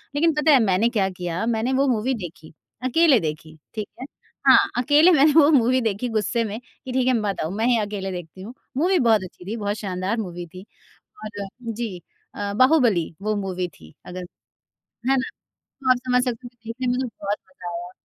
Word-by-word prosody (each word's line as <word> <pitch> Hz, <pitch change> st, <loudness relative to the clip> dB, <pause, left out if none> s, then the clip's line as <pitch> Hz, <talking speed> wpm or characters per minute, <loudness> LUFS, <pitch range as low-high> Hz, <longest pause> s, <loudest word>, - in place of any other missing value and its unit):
लेकिन 325 Hz, +2 st, +3 dB
पता 300 Hz, +1 st, +3 dB
है 275 Hz, -, +7 dB
मैंने 200 Hz, +3 st, +2 dB
क्या 195 Hz, -2 st, +2 dB
किया 180 Hz, +2 st, -3 dB
मैंने 235 Hz, +2 st, 0 dB
वो 275 Hz, +1 st, +2 dB
मूवी 245 Hz, +1 st, +1 dB
देखी 170 Hz, -7 st, -8 dB, 0.3 s
अकेले 280 Hz, 0 st, +4 dB
देखी। 155 Hz, -1 st, -5 dB, 0.2 s
ठीक 215 Hz, -2 st, -4 dB
है? 260 Hz, -, -4 dB, 0.4 s
हाँ, -, -, +9 dB, 0.2 s
अकेले 300 Hz, +7 st, +5 dB
मैंने 300 Hz, -1 st, +5 dB
वो 305 Hz, -2 st, +7 dB
मूवी 255 Hz, -2 st, +4 dB
देखी 220 Hz, +2 st, -1 dB
गुस्से 220 Hz, +2 st, 0 dB
में, 215 Hz, +1 st, -4 dB, 0.3 s
कि 260 Hz, -, -5 dB
ठीक 255 Hz, 0 st, +1 dB
है 255 Hz, -, +4 dB
मत 205 Hz, -2 st, -2 dB
आओ, 160 Hz, -, -2 dB
मैं 220 Hz, +4 st, -1 dB
ही 240 Hz, -2 st, +4 dB
अकेले 205 Hz, -2 st, -3 dB
देखती 175 Hz, 0 st, -8 dB
हूँ 220 Hz, +6 st, -8 dB, 0.2 s
मूवी 360 Hz, +4 st, +3 dB
बहुत 220 Hz, -5 st, +3 dB
अच्छी 180 Hz, 0 st, -11 dB
थी, 215 Hz, +4 st, -4 dB
बहुत 205 Hz, -1 st, -2 dB
शानदार 190 Hz, +2 st, -2 dB
मूवी 175 Hz, -2 st, -6 dB
थी। 185 Hz, +4 st, -12 dB, 0.6 s
और 205 Hz, -2 st, -6 dB, 0.3 s
जी 220 Hz, -4 st, -4 dB, 0.4 s
अ, 205 Hz, 0 st, -3 dB
बाहुबली 240 Hz, -, +3 dB
वो 215 Hz, +1 st, 0 dB
मूवी 185 Hz, -3 st, -2 dB
थी 80 Hz, -, -17 dB
अगर 180 Hz, 0 st, -7 dB, 0.9 s
है 270 Hz, -, +4 dB
ना? 260 Hz, 0 st, -2 dB, 0.5 s
तो 260 Hz, -1 st, +1 dB
आप 255 Hz, -, +6 dB
समझ 250 Hz, 0 st, +3 dB
सकते 245 Hz, 0 st, -4 dB
हो -, -, -7 dB, 0.2 s
देखने 250 Hz, +3 st, -4 dB
में 245 Hz, -, +2 dB
मुझे 260 Hz, -1 st, -1 dB
बहुत 205 Hz, +1 st, -1 dB
मज़ा 180 Hz, -1 st, -9 dB
आया। 175 Hz, +1 st, -6 dB
215 Hz, 205 wpm, -23 LUFS, 185-255 Hz, 0.9 s, हाँ